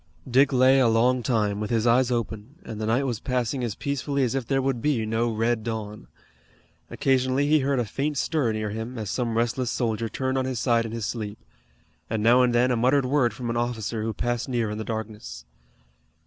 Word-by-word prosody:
Dick 130 Hz, +3 st, +4 dB
lay 130 Hz, +1 st, +5 dB
a 130 Hz, -, +4 dB
long 120 Hz, +3 st, +3 dB
time, 105 Hz, -4 st, 0 dB
with 105 Hz, 0 st, -3 dB
his 115 Hz, -1 st, +1 dB
eyes 125 Hz, +1 st, +4 dB
open, 115 Hz, +1 st, -3 dB
and 110 Hz, -2 st, -6 dB
the 110 Hz, -, -2 dB
night 120 Hz, +5 st, +2 dB
was 120 Hz, -5 st, -2 dB
passing 125 Hz, 0 st, -1 dB
as 115 Hz, -4 st, -2 dB
peacefully 140 Hz, 0 st, -1 dB
as 125 Hz, -, 0 dB
if 135 Hz, -3 st, -2 dB
there 135 Hz, -1 st, +1 dB
would 135 Hz, -3 st, -1 dB
be 130 Hz, -6 st, +1 dB
no 115 Hz, +2 st, 0 dB
red 115 Hz, +1 st, 0 dB
dawn. 110 Hz, -2 st, -5 dB, 0.8 s
Occasionally 130 Hz, +1 st, +1 dB
he 155 Hz, +1 st, +4 dB
heard 140 Hz, 0 st, 0 dB
a 120 Hz, -, 0 dB
faint 140 Hz, +6 st, -2 dB
stir 145 Hz, -5 st, 0 dB
near 110 Hz, -1 st, -3 dB
him, 115 Hz, +3 st, -5 dB
as 105 Hz, -3 st, -4 dB
some 115 Hz, -3 st, -1 dB
restless 120 Hz, +1 st, 0 dB
soldier 115 Hz, -2 st, -1 dB
turned 130 Hz, +2 st, -1 dB
on 130 Hz, -, -1 dB
his 130 Hz, -3 st, -2 dB
side 115 Hz, -1 st, +2 dB
in -, -, -8 dB
his 115 Hz, -2 st, -3 dB
sleep, 105 Hz, -2 st, -4 dB, 0.7 s
and 110 Hz, -1 st, -1 dB
now 120 Hz, +3 st, +6 dB
and 125 Hz, -1 st, +3 dB
then 125 Hz, +2 st, +3 dB
a -, -, +2 dB
muttered 130 Hz, +4 st, +2 dB
word 130 Hz, -2 st, +2 dB
from 120 Hz, -2 st, -4 dB
an 120 Hz, -, -2 dB
officer 115 Hz, -2 st, -2 dB
who 110 Hz, +1 st, -1 dB
passed 120 Hz, +4 st, -2 dB
near 120 Hz, -4 st, -1 dB
in 105 Hz, -, -5 dB
the -, -, -3 dB
darkness. 105 Hz, -, -6 dB
120 Hz, 220 wpm, -25 LUFS, 110-130 Hz, 0.8 s, now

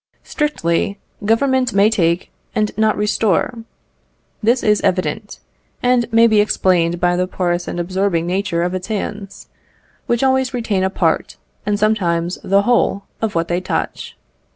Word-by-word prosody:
Strictly, 200 Hz, -, -1 dB, 0.3 s
Government 255 Hz, +3 st, +2 dB
may 200 Hz, +2 st, +4 dB
take 170 Hz, -3 st, 0 dB, 0.2 s
and 215 Hz, -2 st, 0 dB
not 220 Hz, 0 st, +2 dB
restore. 210 Hz, +2 st, 0 dB, 0.8 s
This 235 Hz, +3 st, +2 dB
is 210 Hz, -1 st, +3 dB
evident, 195 Hz, +3 st, -1 dB, 0.5 s
and 245 Hz, -2 st, +2 dB
may 230 Hz, +1 st, +6 dB
be 215 Hz, -2 st, +4 dB
explained 175 Hz, -4 st, +1 dB
by 175 Hz, 0 st, +2 dB
the 180 Hz, +1 st, 0 dB
porous 175 Hz, -1 st, -2 dB
and 175 Hz, -, -4 dB
absorbing 180 Hz, -1 st, 0 dB
nature 180 Hz, -1 st, -1 dB
of 180 Hz, +1 st, -1 dB
its 185 Hz, 0 st, -4 dB
hands, 205 Hz, -2 st, -5 dB, 0.6 s
which 240 Hz, +2 st, +1 dB
always 265 Hz, -1 st, +1 dB
retain 215 Hz, -6 st, -1 dB
a 190 Hz, -, +2 dB
part, -, -, -1 dB, 0.3 s
and 205 Hz, 0 st, +1 dB
sometimes 180 Hz, -5 st, 0 dB
the 195 Hz, +1 st, +3 dB
whole, 220 Hz, -3 st, +1 dB, 0.2 s
of 220 Hz, -4 st, -2 dB
what 165 Hz, 0 st, 0 dB
they 175 Hz, +1 st, -1 dB
touch. 185 Hz, -, -4 dB
200 Hz, 150 wpm, -18 LUFS, 180-225 Hz, 0.8 s, may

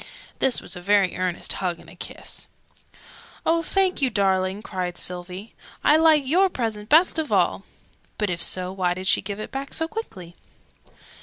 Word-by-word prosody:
("This" 265 Hz, -, +2 dB
was -, -, -4 dB
a 180 Hz, -, -8 dB
very 195 Hz, -1 st, +3 dB
earnest 180 Hz, -1 st, -1 dB
hug 180 Hz, -3 st, -1 dB
and -, -, -16 dB
a -, -, -13 dB
kiss.) -, -, -7 dB, 1.0 s
"Oh, 330 Hz, +1 st, +3 dB
thank 375 Hz, 0 st, +1 dB
you, 265 Hz, -, +4 dB
darling!" 195 Hz, -1 st, 0 dB
cried 180 Hz, -3 st, -4 dB
Sylvie. 180 Hz, +4 st, -6 dB, 0.3 s
"I 300 Hz, -, +5 dB
like 315 Hz, -3 st, +5 dB
your 365 Hz, +8 st, +3 dB
present 220 Hz, -7 st, -4 dB
best 325 Hz, +2 st, +5 dB
of 310 Hz, -, -3 dB
all!" -, -, +1 dB, 0.5 s
(But 210 Hz, -3 st, 0 dB
if 175 Hz, -, -3 dB
so, 185 Hz, 0 st, +3 dB
why 180 Hz, -2 st, 0 dB
did 185 Hz, +1 st, -6 dB
she -, -, +4 dB
give 200 Hz, +1 st, -6 dB
it 215 Hz, -, -6 dB
back 275 Hz, +1 st, -4 dB
so 320 Hz, -, 0 dB
quickly?) 190 Hz, -, -7 dB
205 Hz, 175 wpm, -24 LUFS, 185-300 Hz, 1.0 s, I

